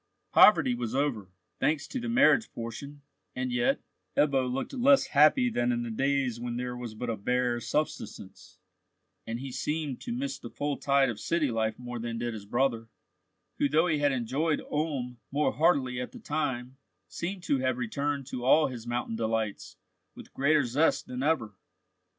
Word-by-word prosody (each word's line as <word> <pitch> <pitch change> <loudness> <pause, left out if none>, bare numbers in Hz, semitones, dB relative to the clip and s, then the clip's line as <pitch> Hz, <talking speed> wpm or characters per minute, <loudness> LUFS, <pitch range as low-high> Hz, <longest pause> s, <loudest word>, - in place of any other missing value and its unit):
Poverty 165 -12 +7
was 120 0 -3
over, 130 -9 -1 0.3
thanks 150 -1 +1
to 265 - -3
the 240 -1 -4
marriage 235 -2 +4
portion, 140 +5 -7 0.3
and 130 0 -2
yet 120 0 +1 0.4
Ebbo 135 -4 +2
looked 135 - -3
less 275 +1 +5
happy 155 - +5
than 120 - +1
in 120 0 -1
the 120 - -5
days 135 0 0
when 120 0 -4
there 125 0 -3
was 120 -3 -7
but 120 +1 -3
a - - -2
bare 125 +3 0
subsistence; 95 -9 -4 0.7
and 115 +1 -3
he 135 0 -6
seemed 145 +1 -3
to 245 - -5
miss 270 +3 -3
the - - -8
full 145 0 -2
tide 140 -1 +3
of 105 - -8
city 155 -3 0
life 110 -1 -1
more 120 -1 -6
than 115 0 -4
did 120 0 -3
his 105 -2 -8
brother, 120 -1 0 0.7
who, 145 - +2
though 160 +4 +3
he 155 -4 +1
had 145 -1 +3
enjoyed 135 +6 0
Ulm 135 -6 -2
more 145 +2 +1
heartily 135 -6 +2
at 125 - -6
the 245 - -9
time, 135 - -3 0.3
seemed 185 +1 -5
to 140 -6 +1
have 130 -1 0
returned 140 +3 -2
to 125 -2 -6
all 150 +5 +5
his 120 -2 -8
mountain 120 -1 -2
delights 110 -2 -2 0.4
with - - -13
greater 145 +2 +3
zest 135 +7 +1
than 125 0 -5
ever. 135 -8 0
130 Hz, 180 wpm, -29 LUFS, 120-150 Hz, 0.7 s, Poverty